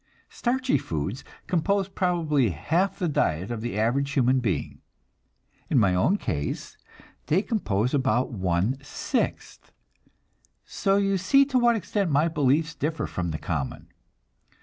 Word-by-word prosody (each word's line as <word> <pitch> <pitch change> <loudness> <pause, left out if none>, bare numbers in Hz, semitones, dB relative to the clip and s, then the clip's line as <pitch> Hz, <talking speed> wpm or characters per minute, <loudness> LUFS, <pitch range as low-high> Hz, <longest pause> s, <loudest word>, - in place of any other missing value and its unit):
Starchy 255 +1 0
foods 85 - -4 0.2
compose 195 +3 +1
probably 165 - +1
half 160 - 0
the 180 - -1
diet 95 - 0
of 115 -2 -4
the 120 -3 -4
average 135 +6 +1
human 130 -1 +3
being. 110 -7 -2 0.9
In 145 - +2
my 100 -6 +4
own 150 - +2
case, 75 - -4 0.5
they 180 +7 +2
compose 125 - -1
about 130 -3 +1
one 95 +3 0
sixth, 145 - -3 0.9
so 195 0 +1
you 195 -1 +1
see 275 +9 +4
to 265 -2 +1
what 240 -1 +4
extent 205 -3 -1
my 150 +2 +3
beliefs 155 0 +1
differ 160 +1 -2
from 90 -2 -3
the 80 - -3
common. 75 -3 -4
140 Hz, 135 wpm, -26 LUFS, -, 0.9 s, my